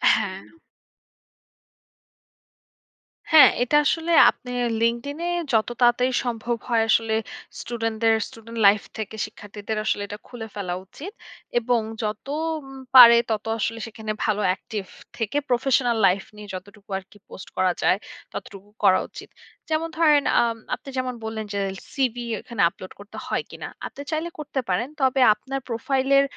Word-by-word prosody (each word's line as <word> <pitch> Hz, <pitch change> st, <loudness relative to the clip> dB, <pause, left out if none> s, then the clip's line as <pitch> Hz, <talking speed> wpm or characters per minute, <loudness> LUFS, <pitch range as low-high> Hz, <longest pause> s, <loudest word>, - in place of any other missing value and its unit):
হ্যাঁ। 195 Hz, -3 st, -3 dB, 2.9 s
হ্যাঁ, 310 Hz, -, +10 dB
এটা 250 Hz, +4 st, 0 dB
আসলে 325 Hz, +3 st, 0 dB, 0.2 s
আপনে 250 Hz, -, -7 dB, 0.3 s
LinkedIn 235 Hz, +5 st, 0 dB
এ -, -, 0 dB, 0.2 s
যত 220 Hz, -1 st, +3 dB
তাড়াতাড়ি 245 Hz, +1 st, +4 dB
সম্ভব 240 Hz, 0 st, -2 dB
হয় 230 Hz, -2 st, +3 dB
আসলে 225 Hz, 0 st, +3 dB, 0.5 s
স্টুডেন্টদের 225 Hz, -1 st, 0 dB
স্টুডেন্ট 230 Hz, +1 st, -11 dB
লাইফ 200 Hz, +1 st, +5 dB, 0.2 s
থেকে 220 Hz, 0 st, -5 dB
শিক্ষার্থীদের 205 Hz, +1 st, -7 dB
আসলে 205 Hz, -, 0 dB
এটা 205 Hz, -, -7 dB
খুলে 230 Hz, -3 st, -8 dB
ফেলা 190 Hz, -4 st, -3 dB
উচিত। 310 Hz, -, -9 dB, 0.5 s
এবং 240 Hz, 0 st, +1 dB, 0.2 s
যত 210 Hz, 0 st, -3 dB, 0.3 s
উম 270 Hz, -2 st, -12 dB, 0.2 s
পারে 235 Hz, -2 st, +11 dB
তত 215 Hz, -1 st, -2 dB
আসলে 225 Hz, +1 st, -2 dB
সেখানে 220 Hz, -1 st, -6 dB
ভালো 210 Hz, -1 st, +1 dB
অ্যাক্টিভ 205 Hz, +2 st, -3 dB, 0.3 s
থেকে 225 Hz, +4 st, -2 dB
প্রফেশনাল 245 Hz, -1 st, +2 dB
লাইফ 190 Hz, +2 st, +1 dB
নিয়ে 210 Hz, 0 st, -10 dB
যতটুকু 205 Hz, +3 st, -12 dB
আরকি 190 Hz, +2 st, -12 dB
পোস্ট -, -, -10 dB
করা 185 Hz, -1 st, +3 dB
যায়, -, -, +3 dB, 0.4 s
ততটুকু 200 Hz, 0 st, -9 dB
করা -, -, +6 dB
উচিত। -, -, -11 dB, 0.4 s
যেমন 315 Hz, +1 st, 0 dB
ধরেন 300 Hz, -3 st, +5 dB, 0.2 s
আম 230 Hz, -1 st, 0 dB, 0.2 s
আপনি -, -, -12 dB
যেমন 255 Hz, -1 st, -1 dB
বললেন 220 Hz, -1 st, -4 dB
যে 200 Hz, -, -1 dB, 0.3 s
"সিভি 245 Hz, -3 st, -1 dB, 0.2 s
এখানে 235 Hz, -4 st, -4 dB
আপলোড 185 Hz, +1 st, -12 dB
করতে 205 Hz, +1 st, -12 dB
হয় -, -, -1 dB
কিনা?", -, -, -7 dB, 0.2 s
আপনি -, -, -10 dB
চাইলে 315 Hz, +2 st, -1 dB
করতে 295 Hz, -2 st, -3 dB
পারেন। 205 Hz, +8 st, 0 dB
তবে 265 Hz, 0 st, +3 dB
আপনার 270 Hz, +6 st, -5 dB
প্রোফাইলের 270 Hz, +4 st, +2 dB
230 Hz, 145 wpm, -24 LUFS, 210-255 Hz, 2.9 s, পারে